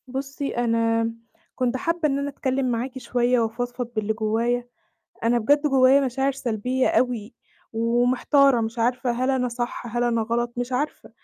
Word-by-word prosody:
بُصّي، 270 +2 -4
أنا 230 -1 +1 0.4
كنت 255 0 0
حابّة 335 +5 -1
إن 275 0 0
أنا 280 0 -2
أتكلّم 265 -2 -1
معاكِ 245 +3 -3
شوية 245 -1 +1
وأفضفض 245 +2 -2
باللي 215 0 0
جوايا. 230 +3 -1 0.6
أنا 235 +1 +3
بجد 285 +6 +3
جوايا 270 0 +5
مشاعر 270 +1 0
سلبية 255 0 -1
أوي، 245 -2 0 0.4
ومحتارة 245 +3 +3
مش 225 +1 -4
عارفة 245 +2 +1
هل 255 +2 -1
أنا 260 -2 +1
صح، 240 0 -4
هل 240 - +1
أنا 235 -1 +1
غلط؟ 235 +2 -1
مش 245 +1 -3
عارفة، 285 +4 -3
245 Hz, 155 wpm, -24 LUFS, 230-260 Hz, 0.6 s, جوايا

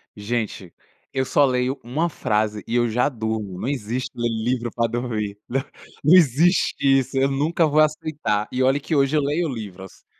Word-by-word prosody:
gente, 105 -4 -4 0.4
eu 130 0 -1
só 145 - +3
leio 130 +1 0
uma 150 +8 -1
frase 105 -5 -1
e 115 - -2
eu 120 -1 +3
já 125 +5 +1
durmo. 110 -6 -4
Não 125 - -3
existe 125 -2 -3
ler 120 0 -1
livro 120 +2 -1
pra 115 -1 +1
dormir. 110 -4 -3
Não 135 +2 +1 0.4
não 155 +5 +5
existe 170 +2 +4 0.2
isso, 135 +1 -4
eu 135 +1 +3
nunca 160 +4 +1
vou 150 +1 +2
aceitar, 155 -9 0
e 125 - -1
olha 135 +2 +3
que 155 +2 -2
hoje 140 +2 +2
eu - - +3
leio 150 +4 0
livros. 100 -6 -8
125 Hz, 180 wpm, -22 LUFS, 110-145 Hz, 0.4 s, não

